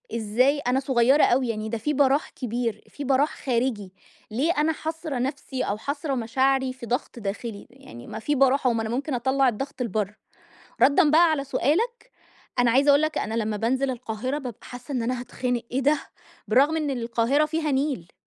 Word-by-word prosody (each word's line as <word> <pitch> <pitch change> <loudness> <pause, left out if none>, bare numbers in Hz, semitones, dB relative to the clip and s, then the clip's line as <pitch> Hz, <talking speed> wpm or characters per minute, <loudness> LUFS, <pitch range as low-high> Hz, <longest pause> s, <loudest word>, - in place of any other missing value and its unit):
إزاي 240 +6 +2
أنا 255 -1 +1
صغيرة 265 +1 +3
اوي 255 +1 +3
يعني، 220 -1 -3
ده 230 - -2
في 295 +7 -1
براح 280 +1 +2
كبير 235 -3 -3
في 290 - -7
براح 275 +3 +2
خارجي، 235 -6 -1 0.4
ليه 275 +10 +1
أنا 305 +2 +3
حاصرة 315 -4 -4
نفسي 265 0 -3
أو 200 - -2
حاصرة 285 +5 -3
مشاعري 260 +2 +1
في 255 -2 -9
ضغط 245 +1 -3
داخلي، 205 +1 -5
يعني 245 - -13
ما 220 - -6
في 290 +6 -1
براح 270 +1 +3
أهو 240 - +3
ما 225 - -1
أنا 220 - -3
ممكن 270 +4 -2
أطلّع 265 +2 +2
الضغط 270 +3 -5
لبره. 210 -2 -2 0.7
ردًا 290 +4 +5
بقى 330 +2 +6
على 290 -3 0
سؤالك 370 - -1 0.5
أنا 245 -1 +4
عايزة 275 +4 +3
أقول 285 +2 +5
لك، 310 - 0
أنا 220 - -3
لما 220 -2 -1
بانزل 260 +5 0
القاهرة 250 +2 -3
بابقى 250 -6 -8
حاسّة 245 +2 -8
إن 245 -3 -1
أنا 245 +1 -1
هاتخنق، 245 -1 -2
أيه 260 - +1
ده! 290 +2 +3 0.5
بالرغم 275 +8 +4
إن 305 -2 -1
القاهرة 240 +3 +1
فيها 310 -1 -1
نيل! 265 - -1
260 Hz, 185 wpm, -25 LUFS, 235-285 Hz, 0.7 s, بقى